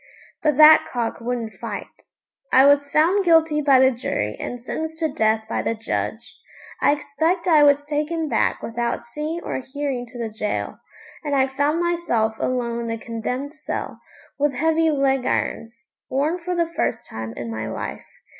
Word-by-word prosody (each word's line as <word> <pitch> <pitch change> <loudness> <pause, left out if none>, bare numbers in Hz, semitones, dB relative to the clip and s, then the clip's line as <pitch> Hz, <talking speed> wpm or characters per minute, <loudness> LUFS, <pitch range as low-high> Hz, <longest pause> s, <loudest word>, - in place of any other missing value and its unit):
But 300 -3 +1
that 310 +1 +8
cock 235 -2 -2
wouldn't 230 -2 -3
fight. - - -4 0.7
I 265 - +7
was 285 0 +4
found 345 +8 +3
guilty 325 -3 +4
by 280 -2 +5
the 260 0 +5
jury 105 - -2
and 245 - -5
sentenced 320 +6 -5
to 320 - +1
death 220 -1 +2
by - - -1
the 230 - -1
judge. 225 +1 -4 0.4
I - - +5
expect 315 +5 -1
I 315 -4 +6
was 290 0 +5
taken 305 +2 -2
back - - 0
without 235 +1 -2
seeing 300 +7 -5
or - - -3
hearing 265 -2 -4
to 245 +1 -12
the 230 -2 -3
gaol, 210 - -2 0.5
and 290 -2 -1
I 265 -1 +4
found 285 +5 0
myself 335 -11 0
alone 240 -2 -1
in 235 - -4
the 230 0 -2
condemned 250 +5 -4
cell, 310 - -5 0.4
with 290 0 +2
heavy 320 +2 +2
leg 270 -3 +1
irons 230 +1 -3 0.2
worn 295 +7 0
for 360 +1 -3
the 340 -1 +2
first 225 - -1
time 110 0 -6
in 115 -1 -5
my 110 0 -4
life. 110 - -6
280 Hz, 175 wpm, -22 LUFS, 235-310 Hz, 0.7 s, that